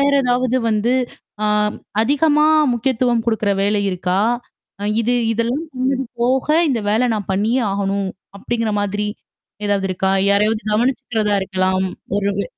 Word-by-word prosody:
வேற 280 0 +3
ஏதாவது 250 0 +1
வந்து 220 +3 +1 0.5
அ - - +2 0.6
அதிகமா 295 +4 +3 0.3
முக்கியத்துவம் 240 -1 +1
குடுக்குற 220 -3 +1
வேலை 205 0 +1
இருக்கா? 180 +1 -1 0.6
அ - - -6 0.2
இது 240 +2 +1 0.2
இதெல்லாம் 235 +8 -1
பண்ணது 260 +1 0 0.2
போக, 255 +2 +1 0.2
"இந்த 240 -5 0
வேல 240 +4 +2
நான் 205 -3 -4
பண்ணியே 225 +6 +1
ஆகணும்" 195 0 -1 0.3
அப்டிங்கிற 230 +1 -2
மாதிரி 205 +1 -2 0.6
ஏதாவது 200 -1 +1
இருக்கா? 190 +1 0 0.2
யாரையாவது 210 +2 +2
கவனிச்சுக்கிறதா 225 -2 0
இருக்கலாம். 185 0 0 0.3
ஒரு 200 0 0
வே 200 - 0
220 Hz, 135 wpm, -19 LUFS, 200-250 Hz, 0.6 s, வேற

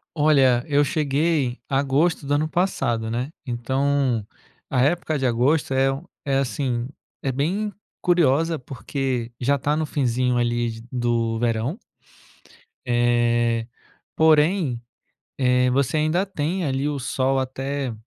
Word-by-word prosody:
Olha, 135 -5 +4
eu 145 -1 +3
cheguei 145 -3 0
agosto 140 +4 +1
do 145 - 0
ano 150 +2 +1
passado, 120 -11 0
né, 125 +4 -2 0.2
então, 130 -1 0 0.4
a 125 - +1
época 155 +2 +1
de 135 - -1
agosto 130 +5 +1
é 135 0 +3
um 135 +4 -7 0.2
é 135 -1 +1
assim, 125 -3 -1 0.4
é 135 - 0
bem 185 +11 -1 0.3
curiosa 165 -2 +2
porque 125 0 -3
já 140 +3 +2
tá 145 +3 0
no 155 0 0
finzinho 125 -3 0
ali 120 0 0
de 115 +1 -11
do 115 -2 0
verão... 120 - -1 1.1
eh, 120 -1 +2 0.5
porém, 155 -4 +3 0.6
eh, 125 -1 +3
você 140 +3 +1
ainda 155 +5 +1
tem 180 0 -2
ali 135 0 -1
o 145 -1 -3
sol 135 +1 0
até 135 0 -3
135 Hz, 130 wpm, -23 LUFS, 120-150 Hz, 1.1 s, Olha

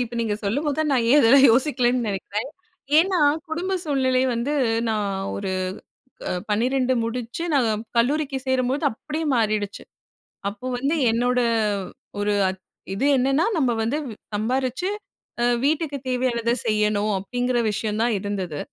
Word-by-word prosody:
இப்போ 235 +1 -9
நீங்க 220 -2 0
சொல்லும்போது 280 +8 -1
தான், 310 -2 +1
நான் 245 -3 +2
ஏன் 290 - +7
இதெல்லாம் 270 +4 +7
யோசிக்கலன்னு 250 -1 +2
நெனக்கிறேன். 205 +5 -3 0.5
ஏன்னா 370 +1 +3 0.3
குடும்ப 355 +4 -2
சூழ்நிலை 260 -3 +1
வந்து, 255 +6 -1 0.3
நான் 215 -2 0 0.3
ஒரு 195 -1 -3 0.7
க - - -3 0.2
12 255 +4 +1
முடிச்சு 240 +6 -4
நான் 225 -5 +1
கல்லூரிக்கு 275 +3 +1
சேரும்போது, 260 +3 0
அப்டியே 310 +7 -5
மாறிடுச்சு. 215 -3 -1 0.7
அப்போ 205 +5 -7
வந்து 275 +5 0 0.2
என்னோட 245 +2 +1 0.8
ஒரு 205 0 +1 0.2
அத் 190 0 -5 0.3
இது 205 - -2
என்னன்னா, 270 +5 +2
நம்ம 260 -5 +2
வந்து 255 +7 0
வி 225 - -7 0.2
சம்பாரிச்சு, 255 - -1 0.5
அ - - +3 0.2
வீட்டுக்கு 295 -1 0
தேவையானதை 245 -2 0
செய்யணும். 210 -1 +1
அப்டிங்கிற 245 +5 -1
விஷயம் 210 +1 -2
தான் 235 -1 +2
இருந்தது. 190 -6 -4
245 Hz, 135 wpm, -23 LUFS, 215-275 Hz, 0.8 s, ஏன்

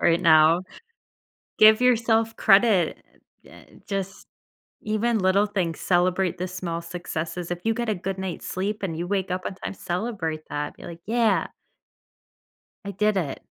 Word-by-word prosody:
right 170 0 +3
now. 160 +1 +5 1.0
Give 215 +2 +7
yourself 225 -2 +2
credit, 195 -4 +4 0.5
e - - -17
eh - - -15 0.2
just 195 -1 -5 0.6
even 220 +2 0
little 195 +2 +3
things, 185 -6 -2
celebrate 180 0 +1
the 185 - -3
small 175 -2 -4
successes, 170 0 -5
if 175 0 -4
you 225 0 +1
get 235 0 -3
a 215 - 0
good 190 +2 -4
night's 190 -2 -5
sleep 200 +3 -3
and 165 -4 -3
you 175 +1 -3
wake 195 -2 -1
up 185 0 -2
on 190 - -4
time, - - -6
celebrate 175 -5 -3
that, 145 0 -4
be - - -14
like, 170 -1 -9
"Yeah" 225 -3 +1 1.4
I 200 - -5
did 210 +1 +1
it. 150 -8 -3
190 Hz, 160 wpm, -24 LUFS, 175-215 Hz, 1.4 s, Give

